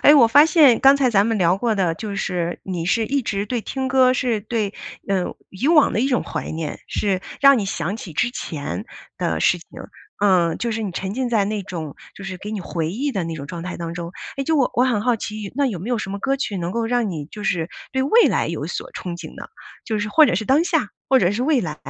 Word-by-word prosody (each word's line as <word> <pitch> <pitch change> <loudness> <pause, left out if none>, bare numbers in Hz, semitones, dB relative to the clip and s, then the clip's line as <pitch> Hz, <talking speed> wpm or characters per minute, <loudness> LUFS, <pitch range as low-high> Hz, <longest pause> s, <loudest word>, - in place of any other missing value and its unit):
诶， 290 - +8
我 265 -6 +7
发 290 +7 +7
现 300 -7 +5
刚 275 +1 +7
才 265 -3 +2
咱 205 -2 +3
们 225 -1 0
聊 180 0 +3
过 225 +1 0
的 180 -4 +1
就 205 +3 -6
是 175 -3 -2
你 180 -3 -4
是 225 +4 +2
一 280 +2 0
直 200 -3 -2
对 245 +1 -2
听 265 +4 -3
歌 260 -1 +4
是 240 -4 0
对 210 -1 -2 0.3
呃， 190 -2 0 0.2
以 225 +9 -2
往 315 -3 +5
的 220 - 0
一 265 - +1
种 250 -3 +1
怀 - - -5
念， 160 -2 -5
是 195 -3 0 0.2
让 275 -2 +7
你 210 - -1
想 180 +1 -3
起 185 -7 -9
之 240 +10 0
前 160 - -5 0.3
的 - - -1
事 - - +3
情， - - -17 0.6
嗯， 175 -4 +3
就 235 -1 -2
是 220 0 -3
你 205 - -3
沉 190 +3 -4
浸 255 0 -1
在 220 -4 +2
那 210 0 -2
种 160 -6 -6 0.2
就 195 - -10
是 185 -1 -6
给 205 +3 -7
你 215 -2 -3
回 165 -3 -3
忆 270 +9 -2
的 190 -5 -2
那 165 - -4
种 140 -3 -7
状 170 +2 -6
态 180 - -5
当 170 -1 -5
中。 170 0 -6 0.2
诶， 275 - -2
就 320 +3 +1
我 270 -4 +2
我 245 - +4
很 240 -5 +1
好 245 0 +2
奇， 210 -2 -6
那 280 +1 +2
有 215 -9 -3
没 200 +9 -5
有 240 - +1
什 195 - -5
么 200 - -4
歌 270 +6 0
曲 215 -7 -3
能 175 -1 -3
够 230 +1 -1
让 240 -3 0
你 155 -5 -5
就 210 +6 -9
是 170 -4 0 0.2
对 265 - +1
未 450 - +5
来 - - +1
有 - - -3
所 - - -5
憧 180 - -5
憬 - - -9
呢， - - -9 0.4
就 220 -1 -2
是 210 0 -2
或 310 +8 +6
者 - - +1
是 210 +5 -1
当 285 +5 +4
下， - - +1 0.2
或 265 - +5
者 180 -6 +3
是 210 +5 -1
未 285 -1 +3
来？ 155 -6 -4
210 Hz, 280 characters per minute, -21 LUFS, 180-255 Hz, 0.6 s, 诶